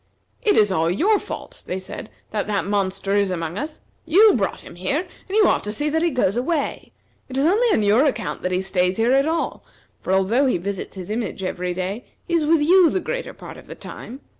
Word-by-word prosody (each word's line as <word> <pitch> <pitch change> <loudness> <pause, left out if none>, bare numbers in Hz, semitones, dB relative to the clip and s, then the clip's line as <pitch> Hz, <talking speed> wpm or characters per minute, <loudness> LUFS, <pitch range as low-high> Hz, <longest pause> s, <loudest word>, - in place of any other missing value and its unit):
"It 420 -4 +3
is 210 -2 +4
all 165 -2 +1
your 390 - +3
fault," - - -8
they 185 - -2
said, 190 +3 -7 0.2
"that 210 -2 -2
that 205 -2 0
monster 195 0 0
is 200 -1 +2
among 165 -2 -3
us. 300 +7 -5 0.2
You 395 +7 +6
brought 195 -5 -1
him - - -12
here, 185 - -1 0.3
and 390 +3 -1
you 430 - +6
ought - - +2
to 210 - -2
see 295 +8 -1
that 320 +2 0
he 340 - +3
goes 250 - +1
away. 280 +4 -2 0.4
It 260 - -5
is 275 - +2
only 425 +9 +3
on 225 - +2
your 215 +8 +4
account 235 -8 -2
that 180 - -2
he 185 +1 +1
stays 185 -1 0
here 230 +3 +3
at 275 +2 +3
all, 325 0 -2 0.4
for, - - -3
although 205 +9 +3
he 250 - +2
visits 195 +3 -5
his 185 +1 -6
image 220 -3 -3
every 180 -1 -3
day, 190 +6 -3 0.2
he 345 - -3
is 330 -3 +3
with 315 -1 +3
you 355 +2 +6
the 375 - 0
greater - - -4
part - - -10
of - - -14
the - - -8
time. 260 +4 -9
225 Hz, 235 wpm, -22 LUFS, 190-315 Hz, 0.4 s, You